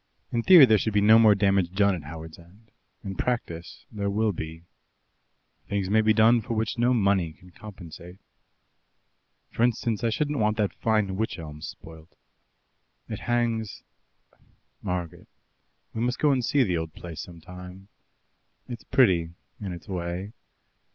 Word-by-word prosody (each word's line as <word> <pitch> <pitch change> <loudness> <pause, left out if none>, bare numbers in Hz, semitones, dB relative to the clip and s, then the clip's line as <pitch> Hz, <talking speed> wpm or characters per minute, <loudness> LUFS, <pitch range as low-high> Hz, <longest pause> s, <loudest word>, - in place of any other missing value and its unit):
In 120 - 0
theory 170 +2 +9
there 110 -4 +4
should 110 +1 -2
be - - +5
no 110 +2 +6
more 110 -2 +6
damage 95 -3 +1
done 100 0 +3
at 85 -5 -6
Howards 80 0 -9
End; 100 +6 -20 0.3
in 95 - -5
practice 85 -10 -4
there 100 -2 -2
will 105 +2 +1
be. 80 -2 -7 1.1
Things 100 -1 -2
may 110 +1 +4
be 110 0 +3
done 115 +2 +5
for 115 +1 -4
which 110 0 -1
no 120 +1 +3
money 100 -8 +1
can 90 +2 -19
compensate. 90 -2 -11 1.3
For - - -4
instance, 115 -2 0
I 115 - +2
shouldn't 145 +5 -1
want 105 0 +1
that 105 -2 0
fine 105 -4 0
wych 110 +2 -2
elm 75 -2 -9
spoilt. 80 +1 -11 0.9
It - - -5
hangs 115 -4 -2 1.0
Margaret, 90 -4 -5 0.7
we 110 - -3
must 125 +2 0
go 150 - +3
and 130 -2 +1
see 140 +3 +2
the 90 -7 0
old 80 -1 -5
place 85 -3 -8
some 85 -2 -11
time. 90 +3 -11 0.8
It's 120 -2 -8
pretty 85 -9 +2 0.2
in 100 -3 -5
its 85 +3 -9
way. 90 +2 -4
100 Hz, 160 wpm, -26 LUFS, 85-115 Hz, 1.3 s, theory